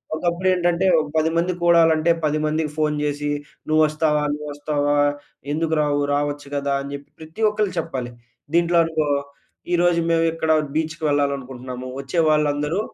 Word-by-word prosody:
ఒకప్పుడు 175 Hz, +3 st, -1 dB
ఏంటంటే 175 Hz, 0 st, +1 dB
ఓహ్! 155 Hz, -1 st, 0 dB
10 160 Hz, +1 st, +3 dB
మంది 175 Hz, +2 st, +1 dB
కూడాలంటే 165 Hz, -1 st, +4 dB
10 155 Hz, 0 st, +1 dB
మందికి 155 Hz, 0 st, -1 dB
ఫోన్ 150 Hz, -1 st, +1 dB
చేసి 145 Hz, 0 st, -2 dB, 0.4 s
నువ్వు 155 Hz, 0 st, +3 dB
వస్తావా? 150 Hz, -1 st, +1 dB
నువ్వు 150 Hz, 0 st, -6 dB
వస్తావా? 145 Hz, 0 st, 0 dB, 0.6 s
ఎందుకు 160 Hz, +1 st, 0 dB
రావు, 145 Hz, -1 st, +1 dB
రావచ్చు 145 Hz, 0 st, -2 dB
కదా! 140 Hz, 0 st, -1 dB
అని 140 Hz, 0 st, -7 dB
చెప్పి 140 Hz, 0 st, -8 dB
ప్రతి 160 Hz, +6 st, -10 dB
ఒక్కలు 210 Hz, -2 st, -1 dB
చెప్పాలి. 130 Hz, -7 st, -4 dB, 0.4 s
దీంట్లో 170 Hz, 0 st, +3 dB
అనుకో 160 Hz, -2 st, -1 dB, 0.7 s
ఈ -, -, +5 dB
రోజు 175 Hz, -1 st, +3 dB
మేము 165 Hz, 0 st, +3 dB
ఇక్కడ 160 Hz, -1 st, 0 dB, 0.2 s
బీచ్‌కి 155 Hz, 0 st, -2 dB
వెళ్ళాలనుకుంటున్నాము 130 Hz, -3 st, -2 dB
వచ్చే 140 Hz, +5 st, -2 dB
వాళ్ళందరూ 150 Hz, +2 st, +1 dB
155 Hz, 155 wpm, -22 LUFS, 145-165 Hz, 0.7 s, ఈ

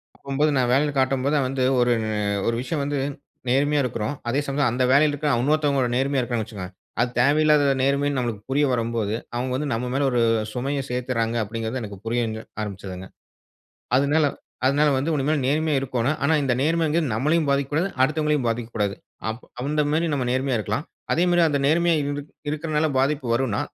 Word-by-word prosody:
அப்பம்போது, 140 Hz, +2 st, 0 dB
நான் 125 Hz, -1 st, +2 dB
வேலையில 145 Hz, +2 st, +2 dB
காட்டும்போது 135 Hz, +2 st, +1 dB
வந்து, 130 Hz, 0 st, -1 dB, 0.2 s
ஒரு 120 Hz, 0 st, +3 dB, 0.3 s
அ -, -, 0 dB, 0.2 s
ஒரு 115 Hz, -, +1 dB
விஷயம் 140 Hz, +3 st, -2 dB
வந்து 145 Hz, 0 st, -2 dB, 0.5 s
நேர்மையா 145 Hz, +3 st, +2 dB
இருக்குறோம். 120 Hz, +3 st, -2 dB
அதே 135 Hz, +4 st, +1 dB
சமயத்துல, 140 Hz, -3 st, +1 dB
அந்த 130 Hz, +1 st, +1 dB
வேலையில 145 Hz, +2 st, +5 dB
இருக்கிற 150 Hz, +1 st, -1 dB
இன்னொருத்தவங்க 140 Hz, -3 st, +1 dB
நேர்மையா 135 Hz, 0 st, +1 dB
இருக்கிறாங்கன்னு 120 Hz, -3 st, -2 dB
வச்சுக்கோங்க, 95 Hz, -2 st, -7 dB, 0.3 s
அது 125 Hz, -, +2 dB
தேவையில்லாத 145 Hz, +1 st, +4 dB
நேர்மைன்னு 140 Hz, +1 st, +1 dB
நம்மளுக்கு 115 Hz, -4 st, -3 dB
புரிய 145 Hz, +2 st, +3 dB
வரும்போது, 115 Hz, -3 st, -1 dB, 0.2 s
அவங்க 125 Hz, +1 st, -2 dB
வந்து 145 Hz, +3 st, -2 dB
நம்ம 125 Hz, +2 st, -2 dB
மேல 140 Hz, +1 st, +1 dB
ஒரு 120 Hz, -1 st, +2 dB, 0.3 s
சுமைய 135 Hz, +3 st, -2 dB
சேர்த்துடுறாங்க 125 Hz, -2 st, -1 dB
அப்படிங்கிறது, 115 Hz, +3 st, -4 dB
எனக்கு 100 Hz, -2 st, -8 dB
புரியங்க 115 Hz, -2 st, -1 dB, 0.2 s
ஆரம்பித்ததுங்க. 95 Hz, -2 st, -6 dB, 0.9 s
அதுனால 145 Hz, +3 st, +3 dB, 0.4 s
அதுனால 145 Hz, +2 st, +3 dB
வந்து 145 Hz, +5 st, 0 dB
உனிமேல் 145 Hz, +1 st, +1 dB
நேர்மையா 150 Hz, +2 st, +1 dB
இருக்கோணும். 130 Hz, +2 st, 0 dB
ஆனா, 140 Hz, +3 st, +3 dB
இந்த 130 Hz, -3 st, +1 dB
நேர்மைங்கறது 160 Hz, 0 st, +1 dB
நம்மளையும் 150 Hz, +8 st, +2 dB
பாதிக்கக்கூடாது, 145 Hz, +6 st, +1 dB
அடுத்தவங்களையும் 150 Hz, -2 st, +1 dB
பாதிக்கக்கூடாது. 115 Hz, -3 st, -1 dB, 0.3 s
அப் 110 Hz, +2 st, -5 dB, 0.2 s
அந்த 150 Hz, +2 st, +1 dB
மேரி 165 Hz, +2 st, +1 dB
நம்ம 130 Hz, -3 st, -1 dB
நேர்மையா 130 Hz, 0 st, 0 dB
இருக்கலாம். 105 Hz, +8 st, -2 dB, 0.3 s
அதே 170 Hz, +3 st, +3 dB
மாரி, 175 Hz, 0 st, +4 dB
அந்த 145 Hz, -2 st, 0 dB
நேர்மையா 170 Hz, +3 st, +3 dB
இருக் 145 Hz, +1 st, -4 dB, 0.2 s
இருக்கிறனால 155 Hz, 0 st, 0 dB
பாதிப்பு 140 Hz, 0 st, +1 dB
வரும்னா, 120 Hz, -5 st, 0 dB
135 Hz, 165 wpm, -24 LUFS, 120-150 Hz, 0.9 s, வேலையில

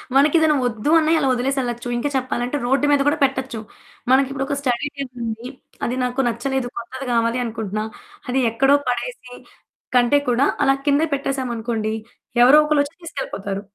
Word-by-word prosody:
మనకేదైనా 305 Hz, +2 st, +4 dB
వద్దు 235 Hz, +4 st, -1 dB
అన్నా 315 Hz, 0 st, +1 dB
ఇలా 280 Hz, -, +1 dB
వదిలేసెళ్ళచ్చు. 245 Hz, -2 st, -2 dB
ఇంకా 275 Hz, +5 st, -1 dB
చెప్పాలంటే 255 Hz, +1 st, -1 dB
రోడ్డు 270 Hz, +4 st, +2 dB
మీద 285 Hz, -1 st, +4 dB
కూడా 295 Hz, +2 st, +3 dB
పెట్టొచ్చు. 265 Hz, -3 st, -1 dB, 0.5 s
మనకి 265 Hz, +1 st, +4 dB
ఇప్పుడొక 275 Hz, +1 st, -2 dB
స్టడీ 255 Hz, +1 st, 0 dB
టేబులుంది. 240 Hz, -3 st, -5 dB, 0.4 s
అది 245 Hz, +2 st, -2 dB
నాకు 250 Hz, +2 st, 0 dB
నచ్చలేదు, 245 Hz, +2 st, -2 dB
కొత్తది 260 Hz, +3 st, -6 dB
గావాలి 230 Hz, +1 st, +1 dB
అనుకుంటున్నా. 215 Hz, -2 st, -3 dB, 0.4 s
అది 260 Hz, +1 st, +1 dB
ఎక్కడో 270 Hz, +5 st, +4 dB
పడేసే 250 Hz, -, -4 dB, 0.6 s
కంటే 250 Hz, +3 st, +5 dB
కూడా 245 Hz, +3 st, +3 dB, 0.2 s
అలా 270 Hz, -, +4 dB
కిందే 290 Hz, +3 st, +3 dB
పెట్టేసామనుకోండి, 235 Hz, -5 st, -2 dB, 0.5 s
ఎవరో 260 Hz, +4 st, +8 dB
ఒకళ్ళొచ్చి 295 Hz, 0 st, +1 dB
తీసుకెళ్ళిపోతారు. 200 Hz, -, -5 dB
260 Hz, 140 wpm, -21 LUFS, 240-280 Hz, 0.6 s, ఎవరో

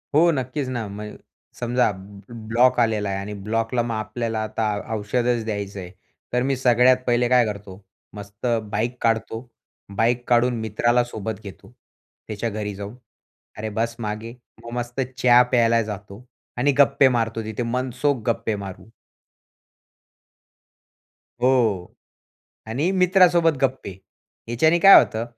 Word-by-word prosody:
हो, 170 Hz, +3 st, +5 dB
नक्कीच 135 Hz, 0 st, -3 dB
ना. 120 Hz, -4 st, -3 dB
म्हण 105 Hz, +1 st, -8 dB, 0.4 s
समजा 120 Hz, -1 st, +1 dB
ब 100 Hz, +1 st, -12 dB, 0.3 s
ब्लॉक 120 Hz, +3 st, +3 dB
आलेला 110 Hz, -3 st, +1 dB
आहे 95 Hz, -, -2 dB
आणि 100 Hz, +2 st, -6 dB
ब्लॉकला 115 Hz, +2 st, 0 dB
मग 115 Hz, -1 st, -3 dB
आपल्याला 115 Hz, +1 st, -3 dB
आता 110 Hz, +1 st, -3 dB, 0.3 s
औषधच 120 Hz, +2 st, -1 dB
द्यायचं 100 Hz, -2 st, -4 dB
आहे. 90 Hz, -1 st, -8 dB, 0.4 s
तर 125 Hz, -, +2 dB
मी 135 Hz, +1 st, 0 dB
सगळ्यात 125 Hz, 0 st, +4 dB
पहिले 120 Hz, 0 st, +2 dB
काय 125 Hz, -1 st, +4 dB
करतो, 100 Hz, -2 st, -7 dB, 0.3 s
मस्त 100 Hz, +2 st, -10 dB, 0.3 s
बाईक 120 Hz, +4 st, -2 dB
काढतो. 115 Hz, 0 st, 0 dB, 0.6 s
बाईक 120 Hz, +2 st, +1 dB
काढून 120 Hz, 0 st, +2 dB
मित्राला 120 Hz, +3 st, +1 dB
सोबत 110 Hz, -3 st, -6 dB
घेतो. 100 Hz, -2 st, -12 dB, 0.6 s
त्याच्या 110 Hz, +2 st, -3 dB
घरी 105 Hz, -1 st, -4 dB
जाऊन, 100 Hz, +3 st, -8 dB, 0.6 s
"अरे 110 Hz, +1 st, -4 dB
बस 115 Hz, +2 st, -2 dB
मागे," 110 Hz, +1 st, -5 dB, 0.3 s
मग 115 Hz, -, -9 dB
मस्त 120 Hz, +1 st, -4 dB, 0.2 s
चहा 125 Hz, -1 st, +6 dB
प्यायला 115 Hz, -2 st, +3 dB
जातो 105 Hz, +1 st, -8 dB, 0.3 s
आणि 140 Hz, +4 st, +2 dB
गप्पे 140 Hz, 0 st, +5 dB
मारतो. 115 Hz, -1 st, -2 dB
तिथे 110 Hz, +3 st, -4 dB
मनसोख 125 Hz, +2 st, -1 dB
गप्पे 110 Hz, -1 st, -1 dB
मारू. 95 Hz, -1 st, -9 dB, 2.6 s
हो, 115 Hz, -8 st, +1 dB, 0.8 s
आणि 140 Hz, +11 st, 0 dB
मित्रासोबत 180 Hz, -3 st, +4 dB
गप्पे. 130 Hz, -6 st, -1 dB, 0.6 s
ह्याच्याने 155 Hz, +9 st, +2 dB
काय 195 Hz, +3 st, +9 dB
होतं, 110 Hz, +1 st, 0 dB
115 Hz, 130 wpm, -22 LUFS, 105-125 Hz, 2.6 s, काय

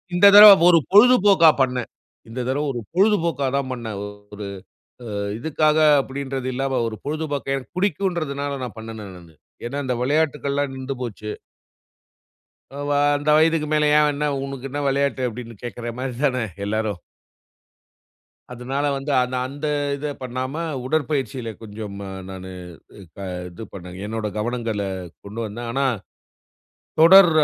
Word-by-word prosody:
இந்த 190 Hz, +3 st, +7 dB
தடவ 210 Hz, 0 st, +12 dB, 0.2 s
ஒரு 165 Hz, -2 st, +6 dB
பொழுதுபோக்கா 205 Hz, -6 st, +7 dB
பண்னேன். 125 Hz, -2 st, 0 dB, 0.4 s
இந்த 120 Hz, -, -6 dB
தடவை 145 Hz, +3 st, 0 dB
ஒரு 120 Hz, -, -4 dB
பொழுதுபோக்கா 170 Hz, -7 st, +2 dB
தான் 135 Hz, -2 st, -1 dB
பண்னேன். 115 Hz, -5 st, -5 dB, 0.4 s
ஒரு 105 Hz, -1 st, -6 dB, 0.6 s
ஆ -, -, -7 dB, 0.3 s
இதுக்காக 155 Hz, +2 st, +1 dB, 0.2 s
அப்படின்றது 135 Hz, -1 st, -5 dB
இல்லாம 135 Hz, 0 st, -1 dB
ஒரு 110 Hz, -, -5 dB
பொழுதுபோக்க 145 Hz, -2 st, -2 dB
எனக்கு 135 Hz, +4 st, -8 dB
புடிக்கும்ன்றதனால 155 Hz, -7 st, -1 dB
நான் 120 Hz, -2 st, -6 dB
பண்ணுனேன் 110 Hz, -3 st, -8 dB
நானு. 85 Hz, -3 st, -16 dB, 0.3 s
ஏன்னா 135 Hz, +4 st, -4 dB
இந்த 125 Hz, -1 st, -1 dB
விளையாட்டுக்கள்லாம் 145 Hz, -1 st, 0 dB
நிண்டு 130 Hz, +1 st, -4 dB
போச்சு. 105 Hz, -3 st, -5 dB, 1.5 s
எ -, -, -4 dB
வ -, -, 0 dB, 0.3 s
"இந்த 150 Hz, +1 st, -2 dB
வயதுக்கு 160 Hz, -1 st, +3 dB
மேல 150 Hz, 0 st, +3 dB
ஏன் 150 Hz, 0 st, +4 dB
என்ன 150 Hz, +1 st, -1 dB, 0.2 s
உனுக்கு 135 Hz, -1 st, -6 dB
என்ன 145 Hz, 0 st, -3 dB
விளையாட்டு?" 140 Hz, -1 st, 0 dB
அப்படின்னு 115 Hz, 0 st, -9 dB
கேக்கிற 120 Hz, -1 st, -5 dB
மாரி 130 Hz, -1 st, -3 dB
தானே 125 Hz, -4 st, +1 dB, 0.2 s
எல்லாரும். 105 Hz, -3 st, -2 dB, 1.5 s
அதுனால, 130 Hz, +4 st, -3 dB
வந்து 140 Hz, +2 st, -4 dB
அந்த 125 Hz, +1 st, -4 dB
அந்த 145 Hz, +3 st, -5 dB, 0.3 s
இத 150 Hz, -, -6 dB, 0.2 s
பண்ணாம 130 Hz, +5 st, -4 dB, 0.2 s
உடற்பயிற்சியில 135 Hz, -4 st, -1 dB
கொஞ்சம் 105 Hz, -1 st, -7 dB
ம 100 Hz, -, -6 dB, 0.2 s
நானு 95 Hz, 0 st, -8 dB, 0.6 s
க -, -, -26 dB, 0.3 s
இது 90 Hz, +6 st, -10 dB
பண்ணேன். 90 Hz, -1 st, -9 dB
என்னோட 110 Hz, 0 st, -3 dB
கவனங்கள 115 Hz, -2 st, -2 dB, 0.4 s
கொண்டு 105 Hz, +3 st, -7 dB
வந்தேன். 115 Hz, +3 st, -6 dB
ஆனா 135 Hz, +2 st, 0 dB, 1.2 s
தொடர் 175 Hz, +2 st, +9 dB
135 Hz, 135 wpm, -22 LUFS, 115-150 Hz, 1.5 s, தடவ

